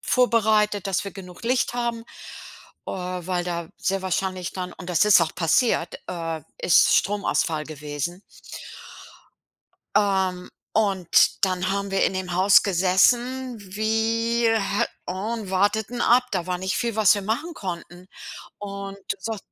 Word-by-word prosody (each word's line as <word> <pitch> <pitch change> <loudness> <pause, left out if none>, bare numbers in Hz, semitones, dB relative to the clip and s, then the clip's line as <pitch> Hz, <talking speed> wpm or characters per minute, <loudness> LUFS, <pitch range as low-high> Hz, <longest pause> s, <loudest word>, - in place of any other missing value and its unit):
vorbereitet, 215 -5 +2
dass 195 -2 0
wir 200 - -5
genug 180 -2 -11
Licht 245 +1 0
haben, 235 -1 -2 0.9
äh, - - -4
weil 180 -1 -3
da 170 -2 -4
sehr 195 0 -1
wahrscheinlich 185 -1 -2
dann 180 -1 -5
und 185 - -10
das 175 +3 +3
ist 210 -3 +6
auch 160 -2 -1
passiert, 175 +2 +1
äh 165 -2 -4 0.2
es 175 - +1
ist - - +4
Stromausfall 185 -6 0
gewesen. 150 +4 -5 1.7
Ähm, 190 -3 +1 0.3
und 195 -3 +3
dann 185 0 -1
haben 200 0 -2
wir 195 - +2
in - - +1
dem 185 -2 -4
Haus 190 +2 +5
gesessen 235 +7 +2 0.2
wie 225 +2 +1
äh, 210 -2 +1 0.2
und 200 +2 -4
warteten 210 +5 0
ab. 245 +2 +5
Da 185 -3 -2
war 180 - -1
nicht 190 +1 -2
viel, 235 -3 -1
was 215 -3 +5
wir 205 - -2
machen 240 - -2
konnten. 180 - -7 0.5
Und 200 -1 -6 0.2
so 225 +2 -4
195 Hz, 140 wpm, -24 LUFS, 180-220 Hz, 1.7 s, ist